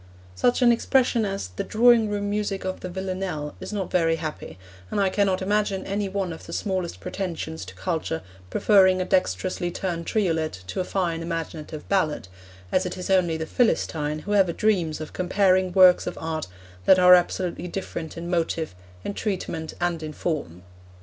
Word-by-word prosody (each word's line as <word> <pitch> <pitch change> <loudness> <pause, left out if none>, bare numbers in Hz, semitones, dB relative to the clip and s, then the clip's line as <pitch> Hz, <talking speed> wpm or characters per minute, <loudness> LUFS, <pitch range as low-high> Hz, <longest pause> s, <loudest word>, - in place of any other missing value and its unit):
Such 245 - +2
an 240 - +7
expression 240 -1 +2
as 195 - -3
'the 90 - -4
drawing 230 -1 +5
room 205 0 -2
music 205 -2 -2
of 185 0 -3
the 180 - -6
Villanelle' 185 -5 -4
is - - -7
not 200 -3 -3
very 165 -2 +3
happy, 155 - -6 0.3
and - - -1
I 195 -1 +2
cannot 190 -2 +1
imagine 205 -1 0
any 200 0 -2
one 190 -2 -2
with 160 - -9
the - - -7
smallest 185 -4 -2
pretensions 165 -4 -4
to - - -11
culture 165 -2 -2 0.3
preferring 190 - +4
a 185 - 0
dexterously 175 - 0
turned 170 -2 -4
triolet 160 - 0
to 90 - -5
a - - +1
fine 175 -3 -1
imaginative 165 -2 -5
ballad, 155 - 0 0.4
as 185 0 +2
it 180 - -6
is 180 +1 -4
only 175 -4 +3
the 160 - -3
Philistine 155 -8 0
who 205 - -1
ever 190 -4 +4
dreams 175 -8 +1
of 155 - -7
comparing 185 0 +2
works 185 -1 +6
of 180 - -4
art 160 -1 -3 0.4
that 190 - +7
are 180 0 +8
absolutely 180 0 +1
different 170 -3 -5
in 170 +1 -5
motive, 165 - -1 0.3
in - - -3
treatment, 180 -7 -3
and 175 -2 -1
in 155 -1 -5
form. 90 - -3
180 Hz, 175 wpm, -25 LUFS, 165-195 Hz, 0.4 s, are